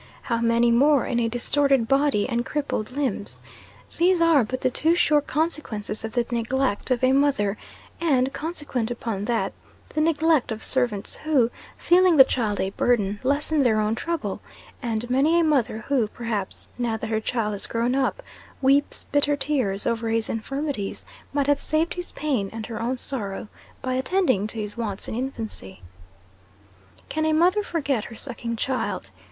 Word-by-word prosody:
how 235 - 0
many 235 0 +3
more 275 +3 +4
in 240 - 0
a 230 -1 +1
distorted 265 +1 +2
body 275 -6 +2
and 240 -2 -1
crippled 280 -6 -2
limbs! 275 +1 -3 0.6
These 355 +1 +4
are 330 -5 +5
but 255 +4 -4
the 255 - +1
too 325 +6 +2
sure 300 -4 +4
consequences 285 -10 -2
of 225 0 -5
the 240 -1 +1
neglect 240 0 -1
of 255 -1 0
a 255 - +5
mother, 270 -8 +2 0.4
and, 270 -5 +2
consequent 295 -8 -3
upon 225 -4 -3
that, 235 0 -1 0.4
the 305 - -1
neglect 315 -4 +2
of 220 0 -4
servants, 240 -6 +1
who, 270 -7 +2 0.3
feeling 355 -1 +4
the 265 - +11
child 225 -6 -1
a 190 - -1
burden, 205 -3 +1
lessen 285 +3 +1
their 225 -5 +3
own 215 0 +1
trouble; 235 - -3 0.4
and 235 -2 -2
many 285 +7 +3
a - - +3
mother 265 -8 +1
who, 260 -6 +2
perhaps, 215 -4 -5
now 235 -2 0
that 225 0 -5
her 220 0 0
child 220 -2 -1
has 205 - -3
grown 235 +2 0
up, 275 - 0 0.4
weeps 275 +2 +2
bitter 290 0 +1
tears 260 -9 -1
over 230 -1 -1
his 225 0 0
infirmities, 270 -2 -3 0.3
might 285 -1 +1
have 285 0 +2
saved 315 +2 +1
his 355 0 -6
pain 260 -10 -1
and 220 -1 -6
her 225 -2 -6
own 250 +3 -1
sorrow 215 -6 -3 0.4
by 255 -1 -1
attending 260 - +1
to 220 +1 -5
his 210 -1 -4
wants 210 -4 -4
in - - -4
infancy. 225 - -5 1.3
"Can 315 - -2
a 315 0 +2
mother 360 +6 +4
forget 285 - -1
her 230 - -9
sucking 235 -1 -3
child?" 255 +3 -2
255 Hz, 170 wpm, -24 LUFS, 225-290 Hz, 1.3 s, the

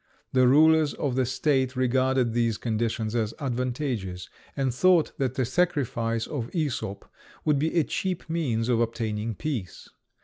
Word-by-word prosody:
The 130 -1 +5
rulers 155 +2 +5
of 140 -3 -2
the 130 -2 +1
state 130 0 +1
regarded 130 -1 +1
these 115 -2 +1
conditions 110 -1 -2
as 115 -2 -1
advantageous, 125 -8 -3 0.3
and 135 -3 0
thought 175 +4 +4
that 130 -2 -1
the 130 - +1
sacrifice 120 -8 0
of 125 -6 -4
Æsop 140 - -2 0.4
would 150 -2 +3
be 160 +4 0
a 165 - +5
cheap 185 +3 -3
means 135 -9 -1
of 120 -2 +2
obtaining 115 -1 -2
peace. 125 - -5
130 Hz, 145 wpm, -26 LUFS, 115-145 Hz, 0.4 s, The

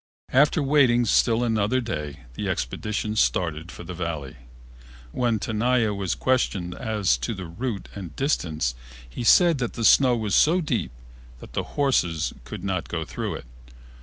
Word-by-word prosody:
After 145 +3 +4
waiting 130 -4 +4
still 115 +2 +3
another 110 +1 +1
day 75 - -5
the - - -3
expedition 105 0 -2
started 85 -5 0
for - - -10
the 90 +1 -7
Valley. 80 -6 -4 0.8
When 120 - +1
Tenaya 110 +2 +1
was 100 -3 -2
questioned 100 -9 0
as 105 - 0
to 60 - -3
the 95 -1 -6
route 100 +5 -4
and 95 -5 -8
distance 80 - 0 0.3
he 60 - -6
said 170 +4 +5
that 120 -3 -2
the 115 - -2
snow 125 +2 +6
was 110 -3 -2
so 170 +4 +5
deep 125 - -1 0.5
that - - -13
the - - 0 0.2
horses 90 - +1
could 105 -4 -8
not 95 -3 -2
go 80 -2 -3
through - - -4
it. - - -9
105 Hz, 160 wpm, -25 LUFS, 85-125 Hz, 0.8 s, snow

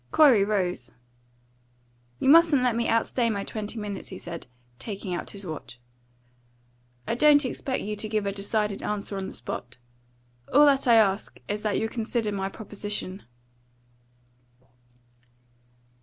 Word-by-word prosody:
Corey 260 - +6
rose. 185 - -1 1.3
"You - - -1
mustn't 310 -3 +6
let 245 -2 +2
me 235 0 0
outstay 230 +1 +1
my 200 -3 -2
twenty 215 +2 -5
minutes," 210 -2 -5
he - - -8
said, 170 -4 -8 0.3
taking 200 -3 -5
out 175 - -4
his 200 -1 -7
watch. 155 -7 -8 1.3
"I - - 0
don't 290 +3 +5
expect 260 +1 -3
you 210 +1 -3
to 215 +1 -4
give 215 -1 0
a 200 - 0
decided 205 +1 -1
answer 210 -1 -3
on 190 -1 -3
the - - -8
spot. 120 +1 -7 0.7
All 290 +3 +7
that 275 -2 +3
I 235 - +7
ask 205 -2 +2
is 210 +1 -2
that 210 -2 0
you'll 225 - -1
consider 225 -1 -1
my 195 -1 -2
proposition." 205 -2 -5
210 Hz, 140 wpm, -26 LUFS, 195-235 Hz, 1.3 s, All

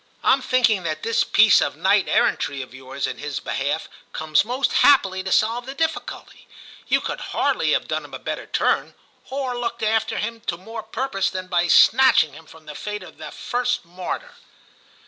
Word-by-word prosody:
Tm 265 -1 +3
thinking 245 -7 +2
that 155 -2 -4
this 230 - +2
piece 210 -1 +5
of 145 - -1
knight 190 +5 +2
errantry 140 -2 +1
of 125 - -14
yours 130 +1 -5
in - - -5
his 145 -4 -4
behalf 140 +6 -2 0.3
comes 155 -2 +2
most 250 +5 -1
happily 195 -10 +4
to 190 0 -5
solve 230 +5 +1
the 270 - -6
difficulty; 320 +2 -4 0.4
you - - +3
could - - -5
hardly - - 0
have - - 0
done - - -2
him - - -14
a - - -4
better - - -5
turn, - - 0 0.3
or 265 -2 -3
looked 235 -1 -4
after 220 0 0
him 230 +1 -4
to 170 - -1
more 225 +5 -8
purpose 220 -1 -2
than 185 0 -5
by 175 -1 +1
snatching 225 - +5
him 160 +2 -14
from 160 -1 -16
the 150 - -8
fate 210 +5 -6
of - - -14
the 155 -1 -7
first 245 +2 -2
martyr.' 185 - -6
205 Hz, 185 wpm, -22 LUFS, 160-240 Hz, 0.4 s, piece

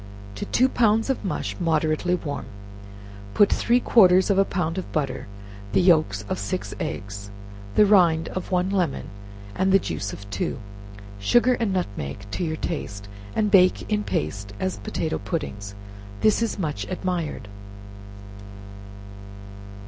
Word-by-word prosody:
To 100 - -5
two 255 - +3
pounds 225 -1 +2
of 265 - -4
mush 190 - -3
moderately 160 +1 +1
warm, 145 -5 -5 0.9
put 205 - +5
three 240 +1 +3
quarters 190 -5 +5
of 195 - +3
a - - +6
pound 180 -2 -2
of 185 - -7
butter, 135 -7 -2 0.5
the - - +4
yelks 155 - +3
of 95 - -2
six 100 - -3
eggs, 100 0 -5 0.5
the 210 - +7
rind 175 -6 +4
of 185 - -5
one 185 +1 +1
lemon, 180 -7 -1 0.4
and 190 +1 +3
juice 100 - -4
of 100 - -9
two; 95 - -2 0.6
sugar 240 - +4
and 230 -4 -1
nutmeg 100 - -3
to - - -2
your 160 -2 -2
taste, 100 -13 -5 0.3
and 210 -1 +1
bake 185 +2 +4
in 210 0 +1
paste 100 - -3
as 185 -1 -2
potato 160 - -3
puddings. 105 - -5 0.5
This 215 +1 +3
is 230 - -1
much 150 - -3
admired. 175 - -3
175 Hz, 140 wpm, -24 LUFS, -, 0.9 s, the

